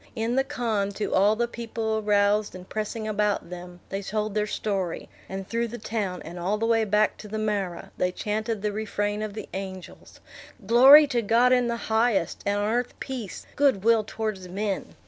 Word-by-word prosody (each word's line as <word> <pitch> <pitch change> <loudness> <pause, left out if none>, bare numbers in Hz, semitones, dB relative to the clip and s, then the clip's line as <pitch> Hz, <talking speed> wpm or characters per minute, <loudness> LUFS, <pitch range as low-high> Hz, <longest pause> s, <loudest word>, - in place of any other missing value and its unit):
In 230 +1 -1
the 270 - +3
khan, 220 -6 -1
to 210 - -3
all 205 +3 +4
the 235 +2 0
people 225 -2 -3
aroused 205 -1 +2
and 185 0 -10
pressing 215 +1 -4
about 210 -4 0
them, 180 0 -9
they 195 +1 -3
told 215 +1 -2
their 210 0 0
story; 195 -5 -3 0.2
and 190 0 -5
through 235 +1 -1
the 235 +2 -7
town, 210 -5 -3
and 175 +2 -8
all 190 +5 0
the 225 - -1
way 225 -1 +3
back 210 +1 +2
to 215 - -10
the 215 +1 -4
marah, 205 -5 -2
they 180 - +1
chanted 215 +2 -3
the 210 - 0
refrain 205 0 -2
of 215 -1 -4
the 220 - -6
angels, 190 -1 -8 0.5
"Glory 265 +7 +9
to 250 -5 0
God 235 +4 +4
in 250 -1 +3
the 235 0 -1
highest, 220 -5 0
and 205 0 +1
on 205 - 0
earth 245 +2 -1
peace, 250 -8 -6
good 275 -9 +3
will 225 -1 +4
towards 215 -4 -4
men!" 195 +2 -3
215 Hz, 195 wpm, -26 LUFS, 200-230 Hz, 0.5 s, Glory